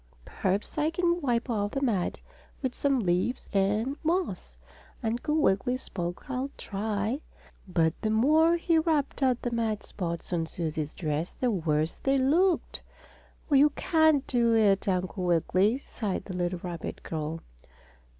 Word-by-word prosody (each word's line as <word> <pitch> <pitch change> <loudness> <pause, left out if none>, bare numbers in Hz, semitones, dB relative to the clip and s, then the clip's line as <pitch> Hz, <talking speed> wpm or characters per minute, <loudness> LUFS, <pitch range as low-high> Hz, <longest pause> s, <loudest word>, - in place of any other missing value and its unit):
"Perhaps 195 +9 -2
I 300 +1 +2
can 345 +1 +1
wipe 245 -3 0
off 205 -4 -1
the 275 - -1
mud 205 -9 0 0.5
with 260 -1 -1
some 275 -3 +1
leaves 185 +6 -1
and 210 +8 +1
moss," 315 - -1 0.5
Uncle 240 +7 -1
Wiggily 245 -1 +2
spoke. 175 -6 -6
"I'll 265 0 -2
try." 215 +5 -2 0.5
But 165 -3 +2
the 215 - 0
more 310 +10 +4
he 335 -1 +2
rubbed 310 -4 0
at 255 -2 +2
the 245 - -1
mud 225 -3 -1
spots 170 -2 -5
on 165 -2 0
Susie's 155 -3 -3
dress 155 0 -2
the 250 -2 0
worse 155 -4 0
they 270 0 +2
looked. 330 +7 +2 0.7
"Oh, - - +3
you 285 +2 +7
can't 315 -4 +3
do 235 -2 +2
it, 205 -3 +3
Uncle 185 0 -1
Wiggily!" 185 +6 +2
sighed 215 -7 -4
the 190 - -6
little 175 0 -2
rabbit 175 -2 -6
girl. 160 0 -4
220 Hz, 150 wpm, -28 LUFS, 180-275 Hz, 0.7 s, you